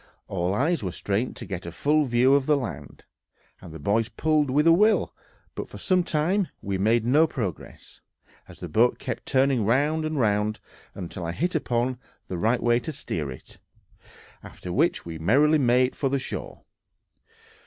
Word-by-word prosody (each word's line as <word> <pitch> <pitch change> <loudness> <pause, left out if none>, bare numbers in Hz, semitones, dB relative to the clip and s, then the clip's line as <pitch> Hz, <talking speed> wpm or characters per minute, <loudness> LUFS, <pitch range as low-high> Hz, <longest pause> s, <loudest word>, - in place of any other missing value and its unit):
All 90 +1 -1
eyes 160 +8 +1
were 95 -3 -3
strained 100 +7 -2
to - - -7
get 90 -3 -6
a - - -5
full 150 - +1
view 125 +2 +3
of 140 -1 +2
the 150 -1 +4
land, 115 - -7 0.6
and 90 - -11
the 80 - -8
boys 105 +8 0
pulled 150 +4 +1
with 145 +4 +2
a 165 - +7
will; 210 +6 +3 0.4
but - - -6
for - - -10
some 185 -2 +1
time 175 +5 0
we 95 -1 -3
made 110 +3 +2
no 150 +7 +4
progress, 110 - -6 0.5
as - - -14
the - - -5
boat 120 +3 +2
kept 125 -3 -6
turning 130 -3 +2
round 145 +8 +1
and 155 -2 -2
round, 105 -1 +1 0.4
until 90 -1 -6
I 85 0 -3
hit 175 - -1
upon 125 -4 -1 0.3
the 90 - -3
right 115 +5 +1
way 120 0 +3
to 125 - -5
steer 85 - -4
it, 65 - -11 0.8
after 90 - -8
which 160 - +1
we 80 -1 -7
merrily 145 - +4
made 125 0 +2
for 135 - -1
the 140 - +1
shore. 130 - -6
125 Hz, 180 wpm, -25 LUFS, 100-150 Hz, 0.8 s, a